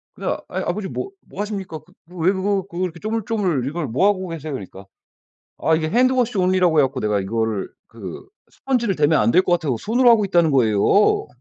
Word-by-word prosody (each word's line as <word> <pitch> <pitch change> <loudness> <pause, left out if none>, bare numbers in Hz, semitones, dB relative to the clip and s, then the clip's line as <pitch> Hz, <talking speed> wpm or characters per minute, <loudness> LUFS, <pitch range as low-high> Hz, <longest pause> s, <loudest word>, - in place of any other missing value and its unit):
근데 - - -6
아 - - -2
"아이 - - -4
아버지 210 -2 -3
뭐 390 - -5 0.2
뭐 200 - -6
하십니까? 195 -6 -5
그 160 +5 -25 0.2
왜 170 +3 +3
그거 195 0 -1
그거 175 +2 -3
이렇게 170 -2 -4
조물조물 210 - -1
이걸 155 +3 -3
뭐 130 - +2
하고 190 -2 0
계세요?" 155 -2 -6
그러니까. 100 -5 -8 0.7
아 160 - +2
"이게 160 0 0
hand 250 +10 +3
wash 245 -3 0
only라고 180 -3 +2
해 - - +5
갖고 135 0 -1
내가 105 -1 0
이거를 110 +1 -2 0.2
그 - - -9 0.2
스펀지를 235 -8 -1
대면 150 +1 +3
안 - - +3
될 185 - +4
것 180 - -1
같아서 155 -8 0
손으로 240 - +3
하고 225 -3 +4
있다."는 175 -4 +2
거예요. 125 - +3
180 Hz, 465 characters per minute, -21 LUFS, 145-205 Hz, 0.7 s, 해